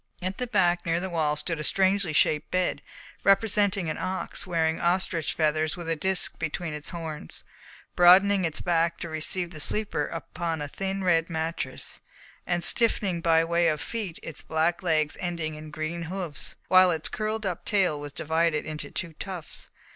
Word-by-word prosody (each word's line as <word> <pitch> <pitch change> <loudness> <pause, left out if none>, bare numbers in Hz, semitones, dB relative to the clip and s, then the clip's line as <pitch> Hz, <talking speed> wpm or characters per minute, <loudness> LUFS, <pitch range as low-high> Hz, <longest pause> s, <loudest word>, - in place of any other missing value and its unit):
At 185 +1 -4
the 250 - -2
back, 180 -6 +2
near 165 0 0
the 190 +1 -4
wall, 155 -3 +1
stood 160 +2 -1
a - - -3
strangely 190 0 +2
shaped 150 0 +2
bed, 185 0 0 0.4
representing 195 -2 +3
an 155 - -3
ox 185 +1 -3
wearing 160 -2 0
ostrich 170 -2 0
feathers 155 0 +1
with 175 -2 -7
a 165 - +1
disc 190 +3 +2
between 160 0 -3
its 150 0 -4
horns, 160 - -6 0.5
broadening 190 +2 +6
its 165 -3 -1
back 170 -1 +1
to 170 - -4
receive 170 +3 -1
the 155 - -8
sleeper 200 -3 +1
upon 165 0 -4
a 145 - -3
thin 195 +5 -3
red 165 -2 +2
mattress, 160 -5 -4 0.5
and 175 -1 0
stiffening 195 -4 +3
by 165 -1 +4
way 170 +1 +2
of 155 -2 +1
feet 210 -8 -4
its 160 - -5
black 160 +2 0
legs 155 -4 +1
ending 170 -3 -3
in 155 0 -9
green 155 +3 -4
hoofs, 175 -4 -4
while 185 0 +7
its 160 -3 0
curled 215 0 -3
up 180 -3 -3
tail 185 -8 +1
was 145 0 -7
divided 160 +1 0
into 150 -2 -6
two 170 -3 -4
tufts. 185 -5 -7
170 Hz, 175 wpm, -27 LUFS, 160-185 Hz, 0.5 s, while